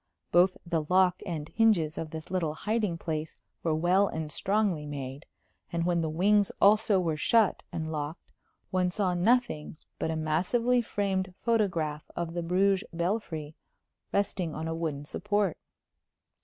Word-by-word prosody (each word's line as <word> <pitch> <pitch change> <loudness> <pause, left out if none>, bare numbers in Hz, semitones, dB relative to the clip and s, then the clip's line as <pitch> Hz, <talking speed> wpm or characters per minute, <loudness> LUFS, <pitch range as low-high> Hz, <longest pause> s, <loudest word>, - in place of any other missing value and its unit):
Both 180 +2 +4
the 165 -2 0
lock 185 -1 +4
and 155 -4 -4
hinges 180 -7 +2
of 160 - -4
this 160 +2 -8
little 165 -5 -1
hiding 210 -3 -1
place 160 -1 -4 0.3
were 160 -2 +1
well 180 +5 +3
and 160 -4 -4
strongly 195 -6 0
made, 140 0 -6 0.4
and 170 0 -1
when 175 -1 +2
the 160 - -1
wings 200 +5 +3
also 210 -1 +5
were 165 -4 0
shut 220 +5 +3
and 160 -2 -3
locked 150 +2 -5 0.4
one 185 -1 +2
saw 185 0 0
nothing 185 -5 +1 0.2
but - - -1
a 160 - -1
massively 185 +11 +1
framed 190 -4 -2
photograph 170 -10 0
of 170 -1 -3
the 175 - -2
Bruges 190 +3 +2
belfry 170 -4 -2 0.6
resting 190 -5 -1
on 160 +1 -4
a 165 - -2
wooden 155 -3 -3
support. 205 +2 0
175 Hz, 150 wpm, -29 LUFS, 160-200 Hz, 0.6 s, also